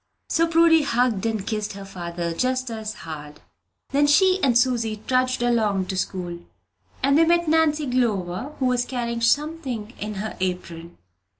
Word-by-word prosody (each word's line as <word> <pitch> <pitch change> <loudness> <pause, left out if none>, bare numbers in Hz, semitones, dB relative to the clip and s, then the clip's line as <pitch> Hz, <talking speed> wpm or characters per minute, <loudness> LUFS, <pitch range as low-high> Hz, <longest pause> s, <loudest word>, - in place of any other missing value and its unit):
So 330 0 +2
Prudy 330 -1 +5
hugged 240 -6 +1
and 220 -3 -2
kissed 210 -1 -3
her 200 0 -9
father 170 -2 -4
"just 255 +5 -1
as 220 -1 -5
hard." 150 -2 -8 0.5
Then 285 +1 +3
she 370 +6 +4
and 250 -4 +4
Susy 230 -4 0
trudged 255 -1 +1
along 215 -5 +1
to 190 - -2
school, 180 -2 -3 0.6
and 280 +2 +4
they - - +6
met 340 0 +2
Nancy 310 -1 +2
Glover, 235 -1 -1
who 265 - -1
was 250 -1 +2
carrying 235 -2 -3
something 255 -3 -1
in 210 0 -4
her 215 +3 -4
apron. 175 -2 -4
235 Hz, 160 wpm, -23 LUFS, 195-280 Hz, 0.6 s, they